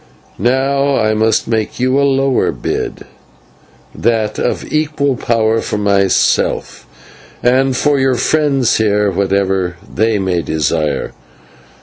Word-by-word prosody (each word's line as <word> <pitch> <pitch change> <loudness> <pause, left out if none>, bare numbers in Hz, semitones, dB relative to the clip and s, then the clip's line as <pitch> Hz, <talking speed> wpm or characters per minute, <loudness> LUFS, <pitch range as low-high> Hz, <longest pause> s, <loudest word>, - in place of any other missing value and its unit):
Now 135 +3 +1
I 110 -2 +1
must 110 0 +1
make 110 0 -2
you 130 +2 +2
a - - +2
lower 135 -1 +1
bid: - - -4 0.9
that 110 -2 -1
of - - -2
equal 150 -3 0
power 115 -1 0
for - - -3
yourself; 100 -2 0 0.6
and 130 +1 +2
for 145 0 +2
your 130 -1 +2
friends 140 -1 +1
here, 105 -2 +1
whatever 95 -1 0
they 110 +1 0
may 95 -3 -1
desire. 80 -1 -1
115 Hz, 115 wpm, -15 LUFS, 100-135 Hz, 0.9 s, you